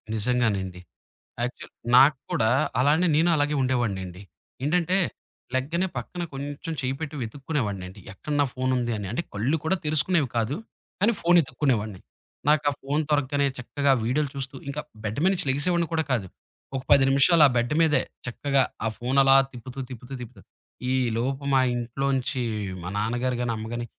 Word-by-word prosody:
నిజంగానండి. 105 -6 0 0.6
యాక్చు 125 - -4 0.3
నాకు 135 +2 +7
కూడా 110 0 +2 0.3
అలానే 155 +7 +4
నేను 165 +3 +4
అలాగే 145 0 +1
ఉండేవాడినండి. 100 -8 -1 0.4
ఏంటంటే, 175 +4 +2 0.6
లెగ్గానే 165 +8 0
పక్కన 175 -1 -5
కొంచెం 145 +4 -5
చెయ్యి 130 +1 -1
పెట్టి 155 -1 -5
వెతుక్కునేవాడినండి. 110 - -4
ఎక్కడ 150 - -5
నా - - +4
ఫోనుందని. 120 -5 -1
అంటే, 130 +9 -2
కళ్ళు 115 +10 +1
కూడా 190 - +2
తెరుసుకునేవి 155 -2 +2
కాదు, 115 +5 0 0.5
కానీ 230 +3 +4
ఫోన్ 175 +1 +5
ఎతుక్కునేవాన్ని. 120 -8 -1 0.5
నాకు 150 -1 +4
ఆ - - -4
ఫోన్ 145 +3 0
దొరగ్గానే 145 -1 +2
చక్కగా 140 +3 0
వీడియోలు 135 +5 0
చూస్తూ 135 0 -5
ఇంక 145 +2 -3 0.2
బెడ్ 110 +4 -3
మీద 190 - +5
నుంచి 175 - -2
లెగిసేవాడిని 170 +5 +2
కూడా 160 - +2
కాదు. 110 -7 0 0.5
ఒక 130 - -1
10 140 -1 +7
నిమిషాలు 150 +4 +5
ఆ - - 0
బెడ్ 120 +4 +1
మీదే 160 -2 +4 0.2
చక్కగా 135 +3 +1 0.2
ఆ - - +2
ఫోన్ 125 +3 -1
అలా 135 0 +6 0.2
తిప్పుతూ, 130 +2 -9
తిప్పుతూ, 125 +1 -9
తిప్పుతూ 120 -4 -10 0.5
ఈ - - +2 0.2
లోపు 135 +4 -2
మా 135 - +5
ఇంట్లోంచి 130 +2 -1 0.4
మా 90 - -4
నాన్నగారుగాని, 120 +2 -1
అమ్మగాని 120 +2 -4
135 Hz, 150 wpm, -25 LUFS, 120-150 Hz, 0.6 s, నాకు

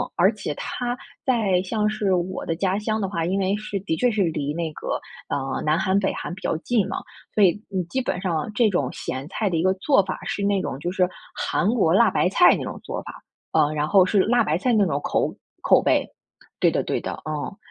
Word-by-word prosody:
而 - - +4
且 - - -4
它 245 0 -3 0.3
在 215 -8 +2
像 210 +2 0
是 210 -3 0
我 180 +1 -2
的 165 - -1
家 190 +2 0
乡 215 +1 -1
的 195 - -1
话， 165 -4 -2
因 190 +3 0
为 195 +1 +1
是 210 -1 -4
的 160 -5 -2
确 245 +5 +2
是 215 -2 0
离 150 -4 -1
那 165 -1 -3
个， - - -3 0.3
啊， 135 -1 -2
南 155 +2 +2
韩、 190 0 +2
北 195 - 0
韩 - - -5
比 185 - -13
较 - - 0
近 215 -1 +1
嘛， - - -3 0.4
所 210 - +5
以 190 +2 +4
你 190 -3 -1
基 260 +10 -2
本 185 -7 -2
上 175 0 -1
这 235 -3 +4
种 175 -9 0
咸 130 +3 -5
菜 205 +1 -1
的 170 - 0
一 160 - +1
个 185 0 +3
做 200 +2 +3
法 185 - -5
是 200 - -2
那 200 -1 +2
种 135 - -4
就 175 +4 -3
是 185 -1 +2 0.3
韩 - - 0
国 195 -9 +3
辣 230 +3 +5
白 180 - +2
菜 205 - +6
那 - - -4
种 - - -6
做 - - -4
法。 - - -8 0.4
嗯， 150 +1 +3
然 150 0 0
后 190 -1 +5
是 200 +2 +2
辣 240 +2 +3
白 155 -3 +1
菜 250 +3 +1
那 210 -3 +4
种 145 -5 -1
口 - - 0 0.3
口 - - +5
味。 - - +3 0.5
对 - - +5
的， - - 0
对 - - -2
的， - - -4
嗯。 155 +5 -4
190 Hz, 260 characters per minute, -24 LUFS, 165-210 Hz, 0.5 s, 菜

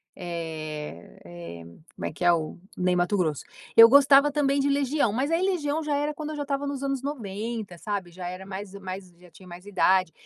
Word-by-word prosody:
eh 155 - -6
eh, 85 -1 -9 0.3
como - - -6
é - - -2
que 175 - -4
é? 175 - +6
O 160 -2 -2 0.2
Ney 180 0 +1
Matogrosso. 175 -4 0 0.3
Eu 230 0 +12
gostava 280 +2 +6
também 285 -1 +1
de 275 - +2
Legião, 280 -4 +1
mas 265 +5 0
aí 330 +1 +2
Legião 320 -5 0
já 300 -1 0
era 295 +1 -1
quando 305 +1 -5
eu - - -5
já 290 - -3
estava 280 0 -2
nos 280 -1 -4
anos 275 -1 -1
90, 220 -6 -5
sabe, 195 -2 -4
já 180 0 -7
era 185 +2 -7
mais 195 0 -7
mais, 190 -1 -7
já 180 0 -17
tinha 180 +3 -16
mais 175 +1 -11
idade, 185 -3 +3
200 Hz, 205 wpm, -26 LUFS, 175-280 Hz, 0.3 s, Eu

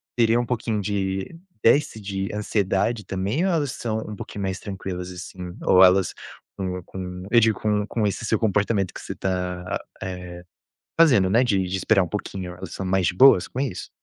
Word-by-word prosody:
teriam 115 0 +3
um - - -5
pouquinho 115 -3 -1
de 95 - -2 0.3
desse 125 -2 +3
de 100 -1 -3
ansiedade 105 +1 0
também, 100 - -1
ou 190 - +2
elas 150 -6 0
são 110 -2 -3
um 105 - -6
pouquinho 100 0 -6
mais 95 -1 -2
tranquilas, 95 -2 -5
assim? 90 0 -8
Ou 95 0 +7
elas 95 0 +5 0.4
com 90 -2 -3
com 90 0 -7
eu 120 - +7
digo, 110 -3 +2
com 105 -1 0
com 110 -1 -1
esse 100 +2 -2
seu 110 - +2
comportamento 105 -2 +1
que - - -8
você - - -6
tá 90 -1 -2
a - - -2
eh, - - -2 1.2
fazendo, 125 - +5
né, 115 +5 +4
de 100 -7 +2
de 90 +2 -2
esperar 95 +2 +3
um 90 - -3
pouquinho. 95 -3 -5
Elas 90 -1 -8
são 95 - -4
mais 95 -2 +2
boas 90 -2 +6
com - - -7
isso? 125 -11 -3
100 Hz, 190 wpm, -24 LUFS, 95-110 Hz, 1.2 s, Ou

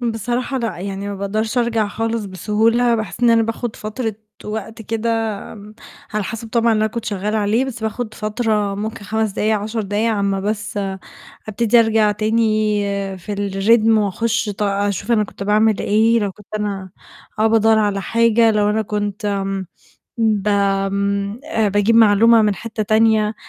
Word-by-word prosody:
بصراحة 240 +3 -2
لأ، 230 -7 -3
يعني 195 +1 -5
ما 200 - -4
باقدرش 215 +4 -2
أرجع 230 -3 +1
خالص 225 +1 -2
بسهولة، 225 +5 +1
باحس 220 0 -4
إن 240 -1 +5
أنا 230 0 +4
باخد 225 +1 -4
فترة 220 +1 -4 0.3
وقت 220 +1 -6
كده، 225 +2 -2 0.4
آمم، 210 0 -12 0.4
على 210 -1 0
حسب 225 +2 -6
طبعًا 230 0 +2
اللي 215 0 +2
أنا - - +3
كنت 235 -1 -4
شغالة 210 0 -2
عليه، 215 +5 +1
بس 240 -4 -7
باخد 220 0 -3
فترة 215 -2 -1
ممكن 215 +1 -5
5 220 +1 -1
دقايق، 215 +2 +1
10 220 +2 -3
دقايق، 205 +3 0
على 215 -2 -1
أمّا 195 -1 0
بس، 210 +1 -3 0.7
أبتدي 230 +2 +2
أرجع 220 -2 +3
تاني 215 0 +1 0.4
في 205 +4 -6
الrhythm 205 +3 +2
وأخش 225 +3 0
ط 205 +1 -5
أشوف 200 +2 -1
أنا 215 -2 +3
كنت 200 - -10
باعمل 210 +1 +2
إيه، 225 +3 +3
لو 200 -2 -2
كنت 210 +2 -15
أنا 195 -3 -4 0.5
آه 215 - +3
بادوّر 225 0 +4
على 205 -2 0
حاجة، 230 +1 +3
لو 210 -1 +2
أنا 220 +1 0
كنت 205 0 -4
آمم، 195 -2 -2 0.5
بآمم، 200 -1 0
آآ، 225 -9 0
باجيب 205 +3 +2
معلومة 225 +1 +6
من 210 -1 +2
حتة 220 +3 -5
تانية، 215 0 +2
215 Hz, 165 wpm, -19 LUFS, 205-225 Hz, 0.7 s, معلومة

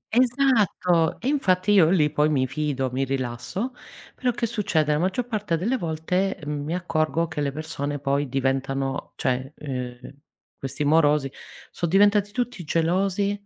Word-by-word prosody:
Esatto, 230 - +2
e 245 - -4
infatti 205 -9 +2
io 175 -6 +6
lì 155 -5 +3
poi 150 +1 +2
mi 135 -3 +2
fido, 135 -1 -2
mi 135 +2 -1
rilasso, 135 - -3 0.4
però 255 - -1
che 240 0 -1
succede? 200 -9 0
La 150 - +2
maggior 190 +7 0
parte 210 -8 -1
delle 225 +10 0
volte 180 0 -1
mi 150 +2 -3
accorgo 165 -1 0
che 150 -2 -4
le 140 -1 0
persone 145 -1 -4
poi 140 0 -1
diventano 135 0 -1
cioè 130 +1 -1
ehm 125 -2 -6 0.5
questi 140 +2 -3
morosi 150 -2 +3 0.4
sono 175 - -3
diventati 205 +2 +4
tutti 245 -6 -3
gelosi 185 +5 +1
160 Hz, 145 wpm, -24 LUFS, 140-200 Hz, 0.5 s, io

